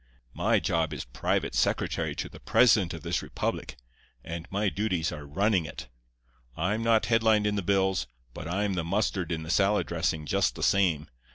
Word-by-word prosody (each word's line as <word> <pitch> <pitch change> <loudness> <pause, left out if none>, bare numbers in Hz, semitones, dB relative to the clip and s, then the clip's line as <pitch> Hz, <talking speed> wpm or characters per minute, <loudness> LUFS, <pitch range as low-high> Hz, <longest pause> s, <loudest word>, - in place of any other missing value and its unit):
"'My - - +2
job 80 -2 0
is 70 - -6
private - - -1
secretary - - 0
to - - -3
the - - -13
president 105 -8 +4
of 80 - -10
this 85 +1 -1
republic; - - -3 0.5
and 85 +1 -6
my 100 +2 0
duties 90 -2 -1
are 75 -2 -8
running 95 +3 +1
it. 65 - -8 0.7
I'm 100 +7 0
not 115 -1 +3
headlined 110 -2 +3
in 105 - +1
the 100 - -1
bills, 95 -6 +1 0.3
but 80 - -7
I'm 100 +3 0
the 85 -2 -1
mustard 95 -1 -1
in 80 -1 -2
the 80 - -4
salad 100 +3 +3
dressing 80 -2 -1
just - - +1
the - - -5
same. 85 -7 +2
90 Hz, 180 wpm, -28 LUFS, 80-105 Hz, 0.7 s, president